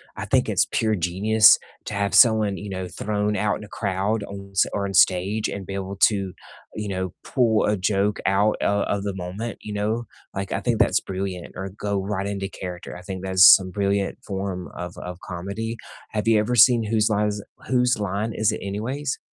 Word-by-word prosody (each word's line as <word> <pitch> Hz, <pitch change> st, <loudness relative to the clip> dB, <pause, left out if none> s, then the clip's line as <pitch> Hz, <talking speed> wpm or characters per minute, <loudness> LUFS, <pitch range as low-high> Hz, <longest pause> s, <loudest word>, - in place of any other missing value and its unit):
I -, -, -5 dB
think -, -, +2 dB
it's -, -, +2 dB
pure 110 Hz, -1 st, 0 dB
genius 100 Hz, +5 st, +5 dB, 0.3 s
to -, -, -5 dB
have 100 Hz, 0 st, -1 dB
someone, 110 Hz, -5 st, +5 dB
you 105 Hz, -, -7 dB
know, 95 Hz, -1 st, -4 dB
thrown 105 Hz, +2 st, -2 dB
out 105 Hz, 0 st, 0 dB
in -, -, -10 dB
a -, -, -10 dB
crowd 100 Hz, +1 st, -1 dB
on 100 Hz, 0 st, -9 dB
s 95 Hz, -, +3 dB
or 100 Hz, -, -1 dB
on 95 Hz, -, -4 dB
stage 95 Hz, +4 st, +3 dB
and 100 Hz, -2 st, -6 dB
be 95 Hz, -, -6 dB
able 95 Hz, 0 st, -4 dB
to, 100 Hz, -4 st, +2 dB, 0.4 s
you 105 Hz, -1 st, -4 dB
know, 95 Hz, -2 st, -3 dB
pull 115 Hz, -5 st, +2 dB
a 105 Hz, -1 st, +1 dB
joke 100 Hz, +2 st, 0 dB
out 100 Hz, +2 st, +2 dB
o 100 Hz, 0 st, +1 dB
of 100 Hz, -, -1 dB
the 100 Hz, -2 st, -3 dB
moment, 95 Hz, +5 st, -5 dB
you 105 Hz, -, -7 dB
know? 110 Hz, +3 st, -1 dB, 0.3 s
Like 100 Hz, 0 st, -4 dB
I 95 Hz, -, -1 dB
think 115 Hz, +2 st, 0 dB
that's -, -, +4 dB
brilliant. 95 Hz, -2 st, -5 dB
Or 95 Hz, +1 st, -5 dB
go 100 Hz, 0 st, -3 dB
right 100 Hz, 0 st, -2 dB
into 100 Hz, -1 st, -3 dB
character, 90 Hz, -2 st, -7 dB
I -, -, -11 dB
think 95 Hz, 0 st, -6 dB
that's 95 Hz, 0 st, +6 dB
some 95 Hz, -1 st, -3 dB
brilliant 100 Hz, 0 st, -1 dB
form 95 Hz, -2 st, -4 dB
of 90 Hz, 0 st, -6 dB
of 90 Hz, 0 st, -7 dB
comedy. 100 Hz, +6 st, -5 dB, 0.3 s
Have 105 Hz, +1 st, -2 dB
you 110 Hz, -1 st, +5 dB
ever 105 Hz, +4 st, -1 dB
seen 120 Hz, 0 st, +6 dB
Whose 110 Hz, -1 st, +2 dB
Line 105 Hz, 0 st, +1 dB
Is 105 Hz, 0 st, -4 dB
It -, -, -19 dB, 0.2 s
Whose 125 Hz, -1 st, +3 dB
Line 105 Hz, +3 st, -2 dB
Is 110 Hz, 0 st, +2 dB
It -, -, -4 dB
Anyways? 125 Hz, +8 st, -3 dB
100 Hz, 210 wpm, -23 LUFS, 95-110 Hz, 0.4 s, that's